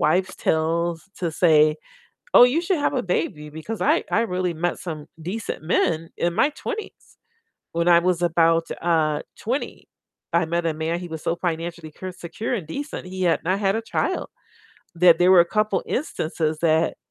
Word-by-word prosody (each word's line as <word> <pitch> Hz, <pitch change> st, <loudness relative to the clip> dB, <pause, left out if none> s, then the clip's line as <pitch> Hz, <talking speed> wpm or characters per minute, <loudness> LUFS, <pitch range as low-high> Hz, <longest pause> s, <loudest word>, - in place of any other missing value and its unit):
wives' 180 Hz, +5 st, +2 dB
tales 165 Hz, +2 st, 0 dB
to 170 Hz, -3 st, -1 dB
say, 155 Hz, -2 st, +4 dB, 0.6 s
"Oh, -, -, +10 dB
you 260 Hz, +7 st, +2 dB
should 355 Hz, -2 st, 0 dB
have 290 Hz, -, 0 dB
a 255 Hz, -, 0 dB
baby," 155 Hz, -4 st, -2 dB
because 160 Hz, +9 st, -6 dB
I 310 Hz, +4 st, +3 dB
I 230 Hz, -, +3 dB
really 180 Hz, -5 st, -1 dB
met 175 Hz, +2 st, -2 dB
some 155 Hz, -4 st, -6 dB, 0.2 s
decent 190 Hz, +1 st, -4 dB
men 165 Hz, 0 st, 0 dB
in 170 Hz, 0 st, 0 dB
my 290 Hz, -, +3 dB
20s, 415 Hz, +8 st, -7 dB, 0.6 s
when 170 Hz, +1 st, 0 dB
I 170 Hz, 0 st, +7 dB
was 175 Hz, 0 st, 0 dB
about, 165 Hz, -1 st, +3 dB
uh, 155 Hz, -3 st, +1 dB, 0.2 s
20, 255 Hz, +6 st, -4 dB, 0.5 s
I 170 Hz, -1 st, +3 dB
met 170 Hz, +1 st, -1 dB
a 160 Hz, -, 0 dB
man, 160 Hz, +2 st, -2 dB
he 175 Hz, -, -7 dB
was 160 Hz, -1 st, -6 dB
so 170 Hz, -, 0 dB
financially 165 Hz, -2 st, -4 dB
cure 185 Hz, +4 st, -7 dB
secure, 180 Hz, +8 st, -5 dB
and 180 Hz, -8 st, -5 dB
decent, 285 Hz, -, -5 dB
he 185 Hz, 0 st, -4 dB
had 170 Hz, -1 st, +2 dB
not 185 Hz, +4 st, 0 dB
had 195 Hz, 0 st, +1 dB
a 225 Hz, -, -1 dB
child. -, -, -2 dB, 0.7 s
That 170 Hz, -1 st, +6 dB
there 180 Hz, +1 st, +5 dB
were 180 Hz, -, +8 dB
a -, -, +6 dB
couple 215 Hz, -1 st, 0 dB
instances 160 Hz, -, -2 dB
that 160 Hz, 0 st, +2 dB
170 Hz, 180 wpm, -23 LUFS, 160-190 Hz, 0.7 s, Oh